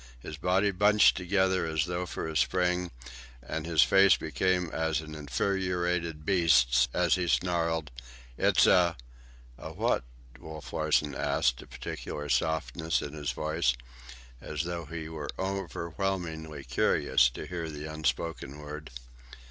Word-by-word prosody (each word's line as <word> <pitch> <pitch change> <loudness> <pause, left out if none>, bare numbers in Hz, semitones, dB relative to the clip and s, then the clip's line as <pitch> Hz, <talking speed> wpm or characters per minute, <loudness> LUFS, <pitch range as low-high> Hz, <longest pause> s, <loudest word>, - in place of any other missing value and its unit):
His 75 - -7
body 95 +6 +2
bunched 105 +3 +5
together 95 -1 +1
as 80 -1 0
though 90 +1 -3
for - - -4
a 80 - -6
spring, 90 +1 +1 0.5
and 75 +6 -5
his 80 -3 +5
face 95 0 +5
became 90 -3 0
as 80 -1 0
an 80 -1 -8
infuriated 85 +2 -1
beast's 80 -10 +4
as 90 -3 +2
he 90 -2 0
snarled, 85 -5 0 0.4
"It's - - +4
a—" 85 -2 +4 0.6
"A - - -7
what?" - - 0 0.4
Wolf 80 -3 -9
Larsen 75 -2 +1
asked, 60 -2 0
a - - -13
peculiar 65 +4 -6
softness 80 +2 0
in 75 - -6
his 75 -2 -4
voice, 75 -2 0 0.7
as 75 +1 -3
though 85 -1 -4
he 80 +1 -6
were 75 -3 -6
overwhelmingly 90 -4 -3
curious 65 - +3
to - - -8
hear 85 -3 -5
the 75 0 -7
unspoken 75 -2 -3
word. 75 +1 -8
80 Hz, 135 wpm, -29 LUFS, 75-90 Hz, 0.7 s, bunched